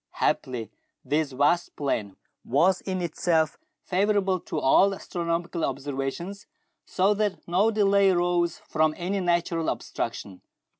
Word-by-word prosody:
Happily 120 Hz, -4 st, -1 dB, 0.3 s
this 150 Hz, -1 st, 0 dB
vast 145 Hz, +6 st, +1 dB
plain 110 Hz, -9 st, -2 dB, 0.3 s
was 175 Hz, +8 st, +2 dB
in 185 Hz, -2 st, -3 dB
itself 160 Hz, -1 st, 0 dB, 0.2 s
favourable 195 Hz, 0 st, +1 dB
to -, -, -6 dB
all 195 Hz, +9 st, +4 dB
astronomical 170 Hz, -1 st, -3 dB
observations, 140 Hz, +8 st, -4 dB, 0.4 s
so 195 Hz, +3 st, +2 dB
that 205 Hz, -2 st, -2 dB
no 185 Hz, +6 st, +3 dB
delay 200 Hz, -2 st, +4 dB
arose 175 Hz, -1 st, +1 dB
from 155 Hz, 0 st, 0 dB
any 185 Hz, +3 st, -2 dB
natural 170 Hz, -2 st, 0 dB
obstruction. 95 Hz, -2 st, -5 dB
175 Hz, 115 wpm, -26 LUFS, 155-190 Hz, 0.4 s, all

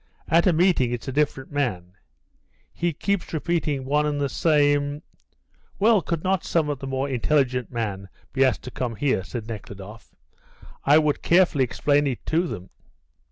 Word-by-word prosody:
At 170 Hz, +3 st, +4 dB
a -, -, +6 dB
meeting 165 Hz, -7 st, +3 dB
it's 120 Hz, -2 st, -5 dB
a -, -, -2 dB
different 135 Hz, -1 st, -1 dB
man 100 Hz, -12 st, -2 dB, 0.8 s
he 175 Hz, 0 st, -1 dB
keeps 200 Hz, +5 st, -2 dB
repeating 155 Hz, -4 st, -1 dB
one 150 Hz, +2 st, +1 dB
and 145 Hz, -1 st, -1 dB
the 140 Hz, -1 st, 0 dB
same.. 145 Hz, -1 st, +2 dB, 0.4 s
." -, -, -36 dB
"Well, 215 Hz, 0 st, +4 dB
could 165 Hz, -2 st, -3 dB
not 190 Hz, -2 st, +1 dB
some 160 Hz, -3 st, 0 dB
of 145 Hz, -3 st, -3 dB
the 135 Hz, -, -6 dB
more 135 Hz, +1 st, -1 dB
intelligent 130 Hz, -1 st, 0 dB
men 100 Hz, -5 st, -4 dB, 0.2 s
be 135 Hz, 0 st, +3 dB
asked 130 Hz, -2 st, +1 dB
to 125 Hz, -, -7 dB
come 120 Hz, -3 st, -3 dB
here?" 130 Hz, -7 st, 0 dB
said 110 Hz, +4 st, -6 dB
Nekhludoff. 105 Hz, -1 st, -9 dB, 0.7 s
"I 145 Hz, +2 st, +6 dB
would 150 Hz, -2 st, +1 dB
carefully 170 Hz, -6 st, +4 dB
explain 145 Hz, +4 st, +1 dB
it 130 Hz, -3 st, -4 dB
to 170 Hz, +3 st, +1 dB
them." 95 Hz, -, -7 dB
145 Hz, 170 wpm, -24 LUFS, 125-160 Hz, 0.8 s, a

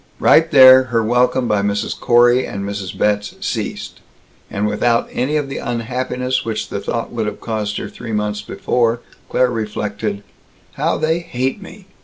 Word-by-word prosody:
Right 160 Hz, +1 st, +5 dB
there, 130 Hz, -2 st, +8 dB
her 115 Hz, -2 st, 0 dB
welcome 125 Hz, +2 st, +2 dB
by 105 Hz, -2 st, +1 dB
Mrs. 100 Hz, +1 st, -1 dB
Corey 120 Hz, +1 st, +4 dB
and 100 Hz, 0 st, -5 dB
Mrs. 100 Hz, -2 st, -5 dB
Betz 105 Hz, 0 st, 0 dB
ceased; -, -, -4 dB, 0.5 s
and 100 Hz, +1 st, -2 dB
without 115 Hz, +3 st, +1 dB
any 135 Hz, +5 st, -1 dB
of 145 Hz, -2 st, -2 dB
the 135 Hz, -, -5 dB
unhappiness 125 Hz, +2 st, -2 dB
which 110 Hz, -1 st, -4 dB
the 100 Hz, -, -3 dB
thought 115 Hz, +3 st, -3 dB
would 115 Hz, -3 st, -2 dB
have -, -, -5 dB
caused 105 Hz, -2 st, -3 dB
her -, -, -4 dB
three 120 Hz, -2 st, -8 dB
months 105 Hz, -1 st, -2 dB
before, 115 Hz, +2 st, -1 dB, 0.3 s
Claire 125 Hz, -1 st, +2 dB
reflected, 105 Hz, -2 st, -3 dB, 0.5 s
"How -, -, 0 dB
they 160 Hz, +2 st, 0 dB
hate 130 Hz, +1 st, -3 dB
me!" 195 Hz, +1 st, -12 dB
115 Hz, 165 wpm, -18 LUFS, 105-130 Hz, 0.5 s, there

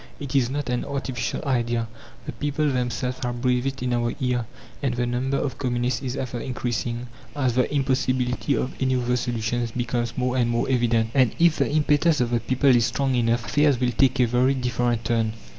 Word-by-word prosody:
It 140 Hz, -2 st, -5 dB
is 125 Hz, -3 st, +3 dB
not 145 Hz, +1 st, -3 dB
an 125 Hz, 0 st, -1 dB
artificial 135 Hz, -2 st, -3 dB
idea. 120 Hz, -3 st, 0 dB, 0.4 s
The -, -, -4 dB
people 145 Hz, +1 st, -1 dB
themselves 125 Hz, 0 st, -2 dB
have 120 Hz, -1 st, -3 dB
breathed 125 Hz, 0 st, +2 dB
it 135 Hz, -1 st, -4 dB
in 125 Hz, -1 st, 0 dB
our 120 Hz, -1 st, 0 dB
ear, 125 Hz, -3 st, -1 dB, 0.3 s
and 135 Hz, -4 st, 0 dB
the 120 Hz, 0 st, 0 dB
number 125 Hz, +3 st, -1 dB
of 140 Hz, -, -3 dB
communists 125 Hz, -1 st, -1 dB
is 130 Hz, -1 st, -3 dB
ever 125 Hz, -3 st, -4 dB
increasing, 120 Hz, -1 st, -3 dB, 0.3 s
as 130 Hz, -4 st, +1 dB
the 125 Hz, +1 st, +1 dB
impossibility 130 Hz, -1 st, 0 dB
of 130 Hz, -, -2 dB
any 130 Hz, 0 st, +2 dB
other 125 Hz, 0 st, 0 dB
solution 120 Hz, -1 st, -1 dB
becomes 120 Hz, -1 st, -2 dB
more 125 Hz, 0 st, 0 dB
and 120 Hz, -2 st, +2 dB
more 120 Hz, 0 st, +1 dB
evident. 120 Hz, -3 st, +1 dB
And 130 Hz, -5 st, +3 dB
if 165 Hz, -1 st, +4 dB
the 140 Hz, -2 st, +1 dB
impetus 150 Hz, +1 st, +3 dB
of 120 Hz, -1 st, 0 dB
the 120 Hz, -, +2 dB
people 130 Hz, +2 st, +3 dB
is 120 Hz, 0 st, +3 dB
strong 135 Hz, +2 st, 0 dB
enough, 120 Hz, -1 st, +1 dB
affairs 145 Hz, -3 st, +2 dB
will 125 Hz, -1 st, +1 dB
take 130 Hz, +2 st, +2 dB
a 125 Hz, -, +5 dB
very 125 Hz, +3 st, +2 dB
different 120 Hz, -2 st, -1 dB
turn. 115 Hz, -2 st, +1 dB
125 Hz, 200 wpm, -24 LUFS, 120-135 Hz, 0.4 s, a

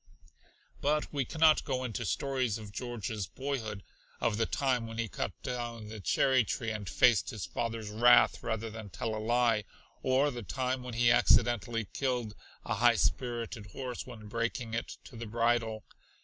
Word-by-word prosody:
But 150 Hz, +2 st, 0 dB
we 140 Hz, -3 st, 0 dB
cannot 160 Hz, +3 st, +4 dB
go 130 Hz, -2 st, -2 dB
into 120 Hz, -2 st, -3 dB
stories 130 Hz, -4 st, 0 dB
of 105 Hz, -2 st, -9 dB
George's 110 Hz, -4 st, -4 dB
boyhood, 115 Hz, -8 st, -4 dB, 0.4 s
of 105 Hz, -, +1 dB
the 115 Hz, -, +1 dB
time 130 Hz, -4 st, 0 dB
when 115 Hz, 0 st, -7 dB
he 115 Hz, 0 st, -1 dB
cut 105 Hz, -, -3 dB
down 120 Hz, -4 st, -4 dB
the 110 Hz, 0 st, -7 dB
cherry 130 Hz, +6 st, +3 dB
tree 115 Hz, +2 st, -2 dB
and 105 Hz, -3 st, -4 dB
faced 120 Hz, -6 st, +4 dB
his 105 Hz, -, -4 dB
father's 115 Hz, -2 st, -3 dB
wrath 120 Hz, +3 st, +5 dB
rather 110 Hz, -1 st, -3 dB
than 110 Hz, -2 st, -8 dB
tell 110 Hz, +6 st, -3 dB
a 110 Hz, -, -3 dB
lie, 115 Hz, -2 st, +3 dB, 0.4 s
or 135 Hz, +3 st, +3 dB
the 120 Hz, -2 st, -6 dB
time 130 Hz, +4 st, -2 dB
when 125 Hz, -2 st, -6 dB
he 120 Hz, 0 st, +4 dB
accidentally 120 Hz, -1 st, +3 dB
killed 120 Hz, +1 st, -2 dB, 0.3 s
a -, -, -1 dB
high 120 Hz, 0 st, +4 dB
spirited 115 Hz, +2 st, -1 dB
horse 125 Hz, -2 st, -5 dB
when 110 Hz, -4 st, -10 dB
breaking 115 Hz, +1 st, -2 dB
it 115 Hz, -, -3 dB
to 125 Hz, -, -13 dB
the 115 Hz, 0 st, -6 dB
bridle. 115 Hz, -1 st, +1 dB
115 Hz, 170 wpm, -31 LUFS, 110-125 Hz, 0.4 s, wrath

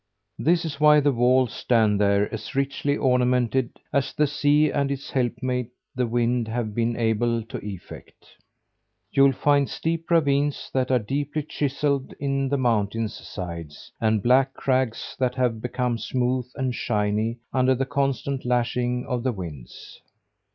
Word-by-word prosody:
This 170 Hz, +1 st, +2 dB
is 145 Hz, -3 st, -5 dB
why 150 Hz, 0 st, +7 dB
the 145 Hz, 0 st, +3 dB
walls 125 Hz, -1 st, +3 dB
stand 110 Hz, -4 st, +2 dB
there 100 Hz, 0 st, +3 dB
as 110 Hz, -, -6 dB
richly 140 Hz, +1 st, 0 dB
ornamented 125 Hz, -1 st, +1 dB, 0.2 s
as 140 Hz, -2 st, 0 dB
the 150 Hz, -, +2 dB
sea 145 Hz, +1 st, +2 dB
and 140 Hz, -1 st, 0 dB
its 140 Hz, -1 st, -5 dB
helpmeet, 125 Hz, -1 st, -1 dB, 0.2 s
the 125 Hz, -1 st, 0 dB
wind, 120 Hz, 0 st, 0 dB
have 110 Hz, -1 st, -3 dB
been 115 Hz, +1 st, 0 dB
able 115 Hz, 0 st, 0 dB
to 110 Hz, -, -8 dB
effect. 100 Hz, -4 st, -10 dB, 0.9 s
You'll 135 Hz, 0 st, +5 dB
find 140 Hz, +1 st, +2 dB
steep 165 Hz, 0 st, -3 dB
ravines 145 Hz, -3 st, +1 dB
that 130 Hz, -1 st, 0 dB
are 130 Hz, -, +4 dB
deeply 145 Hz, +6 st, -2 dB
chiselled 140 Hz, -1 st, -1 dB
in 135 Hz, -1 st, -1 dB
the 140 Hz, -, +1 dB
mountain's 115 Hz, -3 st, 0 dB
sides; 85 Hz, -5 st, -8 dB
and 110 Hz, -2 st, +2 dB
black 135 Hz, +2 st, +3 dB
crags 130 Hz, -4 st, -1 dB
that 125 Hz, -1 st, 0 dB
have 125 Hz, -4 st, 0 dB
become 125 Hz, -1 st, -1 dB
smooth 125 Hz, 0 st, -1 dB
and 130 Hz, -1 st, -1 dB
shiny 105 Hz, 0 st, -1 dB, 0.2 s
under 130 Hz, 0 st, +3 dB
the 135 Hz, +2 st, -1 dB
constant 135 Hz, -1 st, -1 dB
lashing 125 Hz, 0 st, 0 dB
of 125 Hz, -1 st, -2 dB
the 130 Hz, +1 st, 0 dB
winds. 80 Hz, -, -9 dB
125 Hz, 150 wpm, -24 LUFS, 115-140 Hz, 0.9 s, why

